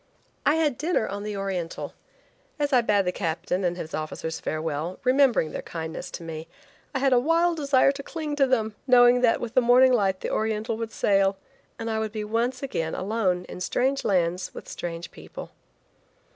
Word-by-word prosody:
I 295 - +5
had 300 -6 +1
dinner 325 -7 +1
on 200 +1 -5
the 210 -1 -4
Oriental. 190 -4 -4 0.6
As 290 -1 -1
I 250 - +6
bade 205 -4 +2
the 180 - +1
captain 180 +1 -2
and 175 -1 0
his 160 -2 -7
officers 155 +1 -4
farewell, 155 +2 -3
remembering 255 - +3
their - - -4
kindness 160 -1 -6
to - - -6
me, 160 -1 -6 0.4
I 275 - -2
had 270 0 +3
a 245 - +6
wild 330 +5 +2
desire 275 -2 +4
to 280 0 -7
cling 305 0 -4
to 275 -2 +4
them, 220 -4 +1
knowing 245 -1 +6
that 235 -2 +3
with 235 -2 -5
the 255 - +5
morning 250 +2 +6
light 195 -5 +1
the - - -3
Oriental 220 +1 -1
would 225 -1 -4
sail, 195 -2 +2 0.4
and 230 - -5
I 220 -1 -1
would 220 -1 -2
be 215 -1 -3
once 235 +5 -1
again 165 -12 -2
alone 185 -3 0
in 180 - -9
strange 265 +9 0
lands 180 -2 0
with - - -9
strange 170 0 -6
people. - - -10
220 Hz, 190 wpm, -26 LUFS, 180-255 Hz, 0.6 s, I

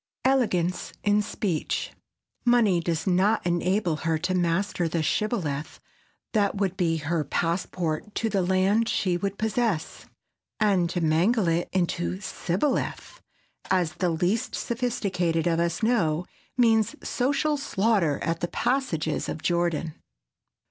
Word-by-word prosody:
[Sidenote: 265 - +5
ELEGANCE 180 -7 -1
IN 205 0 +3
SPEECH] 200 -5 -2 0.5
Money 235 -7 +4
does 165 -1 -2
not 195 +3 +2
enable 175 0 +1
her 165 0 0
to 180 +4 -1
master 175 0 0
the 160 0 -1
"shibboleth" 160 - -1 0.5
that 205 -2 +2
would 195 -2 -1
be 165 -3 +1
her 160 +1 -1
passport 170 +4 -2
to 225 - 0
the 200 -3 +1
land 190 +5 +2
she 180 -3 +1
would 195 +3 -2
possess. 220 -6 -1 0.5
And 195 -5 +3
to 175 0 -2
mangle 175 +7 +2
it 165 +1 0
into 180 0 -1
"sibboleth"—as 190 - -3
the 180 - 0
least 180 +9 0
sophisticated 195 -9 -1
of 165 -1 +2
us 170 +5 -1
know—means 220 - +1
social 280 +4 +1
slaughter 205 - +1
at 165 0 -1
the 175 - -1
passages 240 - -1
of 155 - -5
Jordan. 170 -2 0
185 Hz, 125 wpm, -26 LUFS, 170-215 Hz, 0.5 s, Sidenote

